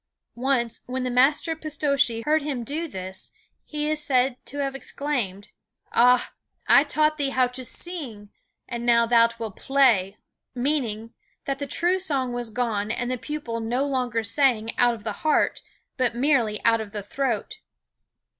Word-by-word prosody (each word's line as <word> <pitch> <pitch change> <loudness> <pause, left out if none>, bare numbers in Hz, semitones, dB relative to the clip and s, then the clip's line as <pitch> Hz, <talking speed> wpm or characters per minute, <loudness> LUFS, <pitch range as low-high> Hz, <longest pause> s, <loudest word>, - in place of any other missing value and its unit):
Once, 245 -2 0
when 255 +1 -3
the 250 - -1
master, 285 +6 +3
Pistocchi, 285 -7 0
heard 310 +1 +3
him 280 -4 -3
do 310 +7 -3
this 190 - -6 0.3
he 300 -1 -3
is 305 0 0
said 260 -4 +2
to 285 - -7
have 275 -1 -1
exclaimed: 250 -8 -3 0.4
"Ah, 250 +1 +4 0.3
I 280 - +7
taught 305 +1 +1
thee 280 -1 +1
how 260 -1 +3
to 255 +1 -7
sing, 250 - -6 0.4
and 235 -1 -5
now 235 -1 +4
thou 230 0 +5
wilt 225 -4 -6
play;" 230 -8 +3 0.4
meaning 240 -4 -1 0.3
that 275 0 -2
the 285 - -3
true 350 +5 +1
song 275 -9 -1
was 240 -1 -3
gone 220 -3 -1
and 240 +2 -2
the 255 - -1
pupil 290 -6 -4
no 240 +5 -1
longer 250 -5 -1
sang 230 -1 +1
out 245 -1 +4
of 215 - -13
the 215 - -2
heart, 310 - +2 0.4
but 250 -3 +1
merely 240 -5 +1
out 230 -1 +4
of 210 -1 -8
the 210 -2 -4
throat. 265 - -2
250 Hz, 165 wpm, -25 LUFS, 230-285 Hz, 0.4 s, I